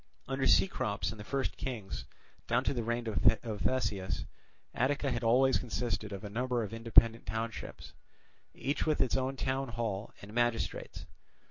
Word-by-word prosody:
Under 135 0 0
Cecrops 105 - +2
and 110 - -9
the - - -6
first 135 +4 -2
kings, 115 -7 -4 0.4
down 120 +2 +2
to - - +1
the 120 - -1
reign 120 +1 -1 0.4
of 110 -4 -4
Theseus, 105 -7 0 0.5
Attica 140 +2 +1
had 120 -1 -2
always 130 +3 +5
consisted 110 -3 -2
of 100 +1 -6
a - - -4
number 125 +1 0
of 110 - -6
independent 115 0 +4
townships, 110 +1 -5 0.6
each 140 +3 -1
with 155 - +2
its 125 - +2
own 130 +1 0
town 135 +1 -1
hall 115 -4 -3
and 100 +1 -11
magistrates. 120 -1 -1
120 Hz, 155 wpm, -32 LUFS, 110-130 Hz, 0.6 s, always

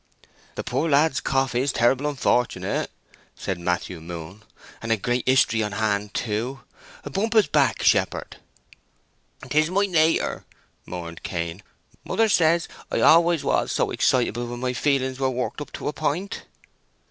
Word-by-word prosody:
"The - - -4
poor 165 - -1
lad's 145 0 +3
cough 135 -1 0
is 130 +3 +1
terrible 130 +5 +2
unfortunate," 125 -3 0 0.5
said 95 -2 -4
Matthew 90 0 -2
Moon. 85 +4 -8 0.4
"And 115 - -3
a 115 - +3
great 120 +4 -1
history 120 -4 +4
on 105 -1 -2
hand, 105 -1 -1
too. 120 +4 -2 0.5
Bump 220 +8 -1
his 220 -3 +5
back, - - +1
shepherd." - - +1 1.1
"'Tis 155 +1 +2
my 200 +3 +2
nater," 165 -4 +1 0.4
mourned 85 -2 -7
Cain. 85 +1 -4 0.4
"Mother 225 -1 +1
says 170 -3 +3 0.2
I - - 0
always 170 -1 +5
was - - +1
so - - 0
excitable 120 +3 +1
when 120 0 -6
my 125 0 -1
feelings 130 0 0
were 135 -1 +1
worked 130 +3 -3
up 145 - -7
to - - -5
a 150 - -1
point!" 160 +7 -3
130 Hz, 145 wpm, -24 LUFS, 105-155 Hz, 1.1 s, his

